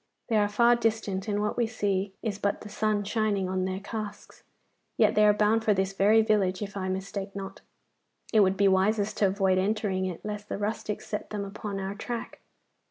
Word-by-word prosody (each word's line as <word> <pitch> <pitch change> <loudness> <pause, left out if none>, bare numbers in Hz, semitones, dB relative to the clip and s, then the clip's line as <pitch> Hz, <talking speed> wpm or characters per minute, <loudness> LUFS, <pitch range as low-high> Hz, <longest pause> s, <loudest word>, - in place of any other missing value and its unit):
They 225 - +3
are 205 -1 +3
far 235 +3 +4
distant, 220 -4 -1
and 205 0 0
what 210 - -1
we 240 -2 +2
see 200 -3 -1
is 205 -3 -2
but 200 0 -1
the 210 - -9
sun 210 0 0
shining 205 -2 0
on 185 0 -1
their 190 0 -3
casques; 210 0 -7 0.6
yet 215 -1 +4
they 210 - +4
are - - +7
bound 210 +2 +2
for 210 -2 +3
this 190 0 0
very 210 +3 +4
village, 205 -3 +1
if 200 0 -7
I 190 -1 -2
mistake 195 +1 -4
not. 195 0 -7 0.7
It 220 - +6
would 195 -1 +4
be 200 - +4
wisest 200 +2 +2
to 200 - +4
avoid 190 -1 +2
entering 195 -1 0
it, 180 +1 -7
lest 210 0 -5
the - - -2
rustics 210 0 -3
set 210 - -4
them 205 -1 -3
upon 200 0 -5
our 195 0 -3
track. 230 +3 -6
205 Hz, 205 wpm, -28 LUFS, 195-215 Hz, 0.7 s, are